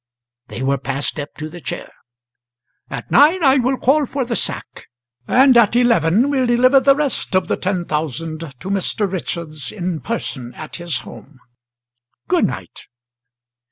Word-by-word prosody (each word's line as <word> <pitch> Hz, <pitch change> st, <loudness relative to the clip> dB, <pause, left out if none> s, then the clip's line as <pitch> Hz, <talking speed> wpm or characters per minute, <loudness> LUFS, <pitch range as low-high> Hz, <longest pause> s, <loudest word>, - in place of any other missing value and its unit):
They 115 Hz, +3 st, -6 dB
were 135 Hz, 0 st, +1 dB
passed 135 Hz, +3 st, -2 dB
up 145 Hz, 0 st, -7 dB
to 155 Hz, -, -6 dB
the 170 Hz, +2 st, -11 dB
Chair. -, -, -6 dB, 1.0 s
"At 135 Hz, -3 st, -7 dB
nine 320 Hz, +5 st, +5 dB
I 270 Hz, -1 st, +5 dB
will 260 Hz, +2 st, +1 dB
call 280 Hz, +3 st, +2 dB
for 270 Hz, -1 st, -2 dB
the 235 Hz, -1 st, -2 dB
sack, 130 Hz, -, -3 dB, 0.4 s
and 260 Hz, 0 st, +5 dB
at 235 Hz, -1 st, +5 dB
eleven 235 Hz, -, +3 dB
will 260 Hz, -3 st, +1 dB
deliver 255 Hz, +3 st, +5 dB
the 275 Hz, +1 st, +4 dB
rest 280 Hz, -9 st, -1 dB
of 185 Hz, -, +2 dB
the -, -, 0 dB
ten 185 Hz, -2 st, -2 dB
thousand 155 Hz, +1 st, -3 dB
to 160 Hz, +2 st, -9 dB
Mr. 200 Hz, +1 st, 0 dB
Richards 165 Hz, -5 st, -4 dB
in 180 Hz, -5 st, -3 dB
person 130 Hz, -, -4 dB
at 155 Hz, -, -8 dB
his 175 Hz, -3 st, -2 dB
home. 150 Hz, -, -13 dB, 0.9 s
Good -, -, +2 dB
night." -, -, -8 dB
185 Hz, 155 wpm, -19 LUFS, 155-255 Hz, 1.0 s, nine